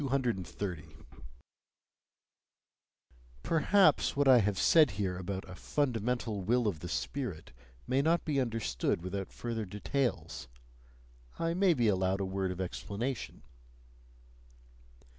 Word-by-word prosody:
230. 100 - -2 2.5
Perhaps 170 +1 +3
what 140 0 +2
I 130 -2 +8
have 100 -2 0
said 155 +4 +6
here 95 -3 -1
about 95 +1 -5
a 90 - -9
"fundamental 120 -3 -1
will 120 +5 +1
of 90 -7 -1
the 90 - -7
spirit" 120 - -4 0.3
may 135 +2 +2
not 165 +4 +2
be 145 -3 +1
understood 110 - -1
without 95 +1 -4
further 115 -2 -4
details; 105 - -2 0.9
I 165 0 0
may 185 -1 +3
be 120 -4 +2
allowed 95 -1 +1
a 100 - -1
word 95 0 -2
of 90 0 -5
explanation. 105 +7 -4
110 Hz, 115 wpm, -31 LUFS, 95-135 Hz, 2.5 s, I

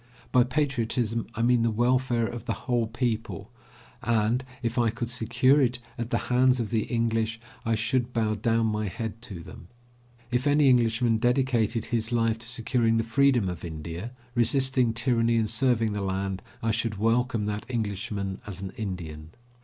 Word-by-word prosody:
By 125 - +6
patriotism 120 -4 -1
I 115 - -1
mean 120 0 +4
the 115 - +2
welfare 120 +1 +2
of 120 +1 -6
the 115 - -1
whole 120 -3 +1
people, 115 -2 -3 0.5
and, 120 0 +1 0.2
if 115 +1 -1
I 115 -1 +3
could 115 +1 -4
secure 125 +4 +3
it 125 -1 +2 0.2
at 115 0 -4
the - - +1 0.2
hands 130 0 +4
of 115 -2 -2
the 110 -2 +1
English, 115 -1 0 0.3
I 115 - +3
should 120 +3 0
bow 110 -2 +1
down 115 +2 +1
my 105 -1 -1
head 110 +2 -5
to 100 -8 -7
them. 85 - -12 0.6
If 125 +3 +1
any 145 -1 +5
Englishman 115 -1 +3
dedicated 120 -2 +1
his 115 -1 -2
life 115 -1 +1
to 115 - -6
securing 115 -1 +1
the 115 - +1
freedom 125 -2 +3
of 90 -2 -5
India, 85 +5 -6 0.2
resisting 125 +1 +2
tyranny 115 0 +1
and 110 -1 +2
serving 115 -1 +1
the 105 - -2
land, 95 0 -2 0.2
I 115 - +2
should 115 -1 -1
welcome 115 +1 +1
that 105 +1 -3
Englishman 100 -4 -3
as 95 -3 -6
an 95 - -5
Indian. 85 -7 -5
115 Hz, 170 wpm, -27 LUFS, 110-125 Hz, 0.6 s, By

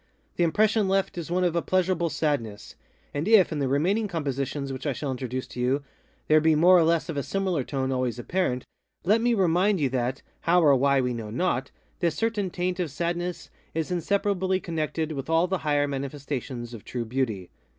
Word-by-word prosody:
The 175 - +2
impression 210 +5 +3
left 195 +1 +1
is 170 -2 -5
one 180 +1 +1
of 175 -2 +1
a 170 - +2
pleasurable 185 -2 +1
sadness. 140 -10 -2 0.4
And 145 +5 -2
if, 215 -6 +6
in 155 - -2
the 140 - 0
remaining 180 +11 +1
compositions 140 -4 -3
which 130 +3 -5
I 140 - +1
shall 140 +2 -3
introduce 130 0 -4
to - - -8
you, 130 +3 +1 0.4
there 155 0 +5
be 160 0 +4
more 175 +4 +6
or 175 - +6
less 165 0 +2
of 165 - -4
a - - +1
similar 185 -2 -1
tone 135 0 -2
always 125 -2 -1
apparent, 125 -1 -1 0.4
let 210 +5 +3
me 240 0 +2
remind 190 +1 +2
you 140 -3 +1
that 125 +1 -2 0.2
(how 175 +1 +3
or 145 -3 +6
why 140 +1 +3
we 125 -1 -1
know 115 -3 -5
not) 135 +1 -1 0.3
this 170 -3 +1
certain 220 -4 -1
taint 180 0 -2
of 175 -3 -1
sadness 175 +4 -3 0.2
is 160 +1 -2
inseparably 190 +1 0
connected 160 -2 -2
with 140 0 -5
all 165 +1 +4
the 190 0 -1
higher 145 -2 +1
manifestations 135 -3 -5
of 115 - -9
true 120 -2 -4
Beauty. 110 -7 -2
155 Hz, 200 wpm, -26 LUFS, 135-180 Hz, 0.4 s, if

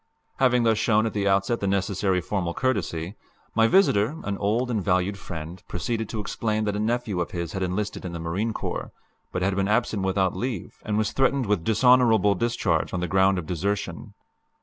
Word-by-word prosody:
Having 125 -2 +3
thus 110 -2 +3
shown 110 -1 +3
at 110 - -2
the 100 -1 0
outset 100 +4 +2
the 100 - -2
necessary 95 -1 0
formal 90 -1 -2
courtesy, 100 -7 -2 0.4
my 115 0 +4
visitor, 115 - +3
an 105 - -2
old 115 +5 0
and 105 -5 -1
valued 95 +1 +1
friend, 85 -2 -7
proceeded 110 +5 -3
to 110 - -4
explain 110 +1 -1
that 105 -1 -1
a - - -2
nephew 110 -4 -1
of 85 - -2
his 85 -2 -4
had 95 - -4
enlisted 95 +3 -2
in 90 - -5
the 85 - -5
Marine 90 +8 -2
Corps, - - -4 0.4
but 90 - -2
had 95 +1 +1
been 95 0 +1
absent 110 -1 +1
without 95 -1 +1
leave, 120 -7 -4
and 105 -1 0
was 110 -1 +1
threatened 135 -1 +1
with 100 -5 0
dishonorable 110 -2 +4
discharge 95 -6 0
on - - -1
the 90 - -1
ground 95 0 +3
of 90 - -3
desertion. 100 +3 -3
100 Hz, 195 wpm, -25 LUFS, 90-110 Hz, 0.4 s, my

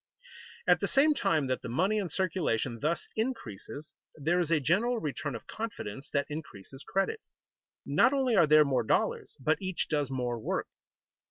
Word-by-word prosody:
At - - +5
the - - 0
same 295 +3 +4
time 165 - +1
that 130 -1 -1
the - - -6
money 190 - +1
in 190 -4 -2
circulation 150 - -1
thus 155 +6 -1
increases, 155 - -4 0.2
there 160 +4 +1
is 170 -3 0
a 165 -2 +3
general 205 - +2
return 150 - -3
of 115 - -8
confidence 145 - -6
that 140 -1 0
increases 140 -5 -8
credit. 195 - -1 0.7
Not - - +4
only 265 -4 +2
are 170 -5 +6
there 155 0 +7
more 135 -2 +2
dollars, - - 0
but 155 +7 +1
each 185 -2 -2
does 145 -3 0
more 125 -3 -2
work. - - -2
155 Hz, 170 wpm, -30 LUFS, 135-195 Hz, 0.7 s, there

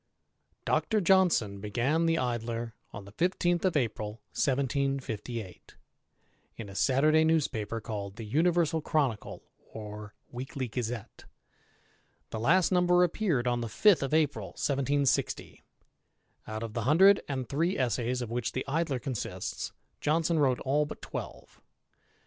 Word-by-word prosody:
M - - -47
[Dr. 220 -2 +1
Johnson 175 - +3
began 125 +11 +1
the 165 0 +2
Idler 120 -2 -2 0.2
on 100 -1 -8
the 100 - -12
15th 175 - +1
of 180 -4 +2
April 110 -5 -2 0.2
1758, 130 -6 -2 0.8
in 110 -3 -7
a - - -9
"Saturday 150 +8 +3
newspaper 125 -9 0
called 100 -3 -5
the 115 - -7
Universal 160 +5 +2
Chronicle^ 140 -9 -1 0.2
or 105 -1 -9 0.2
Weekly 130 +1 -4
Gazette; 115 -1 -5 1.1
^ 110 - -4
last 175 - +4
number 180 -1 +4
appeared 170 - 0
on 120 -1 0
the 115 - -3
5th 195 - +4
of 135 - -2
April 155 -2 +1
1760. 140 0 0 0.9
Out 110 +1 -4
of 115 -2 -6
the 115 - -2
hun 150 +5 +4
*^ 195 +2 +7
and 130 -3 -3
three 165 +6 0
essays 125 -1 0
of 115 - -7
which 120 0 -2
the 130 - -3
Idler 150 -1 0
consists, 125 -3 -4 0.3
Johnson 160 +2 +1
wrote 130 -4 +2
all 145 +3 +1
^* - - -8
twelve. - - -8
130 Hz, 135 wpm, -29 LUFS, 115-160 Hz, 1.1 s, ^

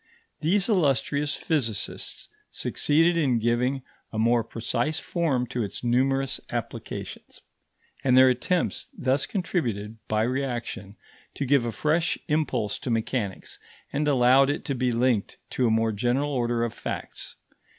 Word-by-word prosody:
These 190 +5 +2
illustrious 145 - +1
physicists 130 - -2 0.2
succeeded 165 +4 +2
in 135 -7 +2
giving 125 +4 +1 0.3
a 110 - -5
more 115 +1 +3
precise 120 +7 -2
form 155 -8 0
to 125 - -2
its 105 +2 -4
numerous 135 +2 +1
applications; - - -6 0.6
and 130 -1 +4
their 130 0 +8
attempts 130 +8 0
thus 130 +1 +1
contributed, 115 - -2
by 110 0 +1
reaction, 120 -5 -3 0.4
to 140 - -2
give 135 -2 +3
a 120 - -1
fresh 155 - +1
impulse 145 -9 0
to - - -5
mechanics, 115 -3 -2 0.3
and 150 +2 0
allowed 135 0 +5
it 145 - -2
to 140 - -1
be 125 -1 0
linked 120 -3 +1
to 125 - +1
a - - +3
more 110 0 +2
general 125 +7 0
order 120 -3 0
of 120 - -2
facts. - - -6
130 Hz, 140 wpm, -26 LUFS, 115-145 Hz, 0.6 s, their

